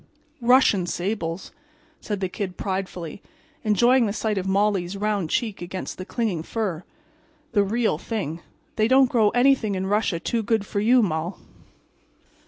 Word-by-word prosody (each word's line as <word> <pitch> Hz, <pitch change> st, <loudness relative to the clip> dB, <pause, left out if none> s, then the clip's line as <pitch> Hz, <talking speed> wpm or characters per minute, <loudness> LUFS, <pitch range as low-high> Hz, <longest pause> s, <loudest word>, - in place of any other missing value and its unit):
"Russian 235 Hz, -7 st, +4 dB
sables," 175 Hz, -1 st, -3 dB, 0.5 s
said 205 Hz, -2 st, -4 dB
the 190 Hz, -, +1 dB
Kid, 185 Hz, -1 st, -5 dB
pridefully, 185 Hz, -3 st, -4 dB, 0.4 s
enjoying 235 Hz, +3 st, +4 dB
the 200 Hz, -, -2 dB
sight 215 Hz, -2 st, -1 dB
of 190 Hz, -, -4 dB
Molly's 195 Hz, -1 st, +1 dB
round 205 Hz, -5 st, -1 dB
cheek 215 Hz, -1 st, -1 dB
against 185 Hz, +2 st, -6 dB
the 185 Hz, -, -5 dB
clinging 215 Hz, -9 st, -1 dB
fur. 185 Hz, -2 st, -3 dB, 0.7 s
"The 210 Hz, -3 st, +3 dB
real 215 Hz, -5 st, 0 dB
thing. 175 Hz, -7 st, -4 dB, 0.4 s
They 215 Hz, 0 st, +3 dB
don't 260 Hz, 0 st, +5 dB
grow 220 Hz, -4 st, +4 dB
anything 245 Hz, -4 st, +3 dB
in 190 Hz, 0 st, -2 dB
Russia 205 Hz, -3 st, +1 dB
too 230 Hz, +6 st, -1 dB
good 220 Hz, -1 st, 0 dB
for 200 Hz, -, -2 dB
you, 240 Hz, +3 st, +4 dB
Moll." 165 Hz, -1 st, -2 dB
205 Hz, 150 wpm, -24 LUFS, 185-225 Hz, 0.7 s, don't